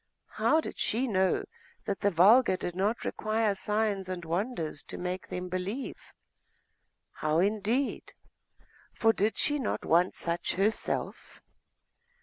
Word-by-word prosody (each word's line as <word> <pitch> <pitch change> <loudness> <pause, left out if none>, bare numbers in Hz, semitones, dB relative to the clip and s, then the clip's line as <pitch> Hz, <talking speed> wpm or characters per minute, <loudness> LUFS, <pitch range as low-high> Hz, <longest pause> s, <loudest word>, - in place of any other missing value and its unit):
How 315 - +3
did - - -8
she 245 +5 +1
know 190 - +1 0.4
that 200 - -2
the 205 - +2
vulgar 195 +4 +5
did 175 -1 -5
not 205 +5 -1
require 215 -1 0
signs 205 -1 -1
and 180 -2 -5
wonders 170 - -2
to - - -6
make 180 +1 -4
them 180 0 -5
believe?.... 185 +8 -5 1.0
How, 155 +1 -1
indeed? 215 +8 0 0.8
for 225 0 +3
did 210 +1 0
she 295 -1 +2
not 250 - -2
want 175 +3 +3
such 170 0 -1
herself? 205 +4 -1
200 Hz, 130 wpm, -29 LUFS, 180-220 Hz, 1.0 s, vulgar